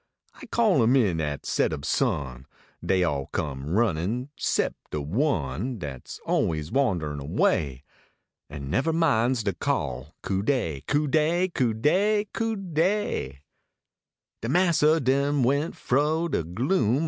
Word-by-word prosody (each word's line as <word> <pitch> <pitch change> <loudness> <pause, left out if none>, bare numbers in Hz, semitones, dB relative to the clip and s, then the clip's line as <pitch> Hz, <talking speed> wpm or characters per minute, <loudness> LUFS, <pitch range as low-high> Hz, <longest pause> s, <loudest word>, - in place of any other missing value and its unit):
I - - -12
called 215 - +3
em 120 +3 +4
in 95 -11 +2
at 75 -2 -3
set - - +1
ob 70 -2 -5
sun: 65 -2 -1 0.4
Dey 90 +1 +2
all 70 -5 -1
come 70 -1 -4
runnin 105 - 0
sep - - 0 0.2
de 75 - -3
one 100 - -1
Dat 70 - -7
s - - -8
always 75 -1 0
wanderin 85 - 0
away. 70 -2 0 0.7
An 70 -1 -6
never 150 - +1
minds 130 -7 +2
de 100 -2 0
call 65 -1 -3
Cu 95 -1 -1
dev! 100 - -1
Cu 145 +1 +1
dey! 160 +5 +2
Cu 125 -9 0
dey! 205 - +2
Cu 225 0 -1
dey! 175 - -1 0.5
" - - -64
De 115 - -3
massa 165 -1 +4
then 140 +1 +1
went 140 +6 +1
fro 150 +6 +1
de 155 - 0
gloom. 120 - +1
120 Hz, 145 wpm, -26 LUFS, -, 0.7 s, em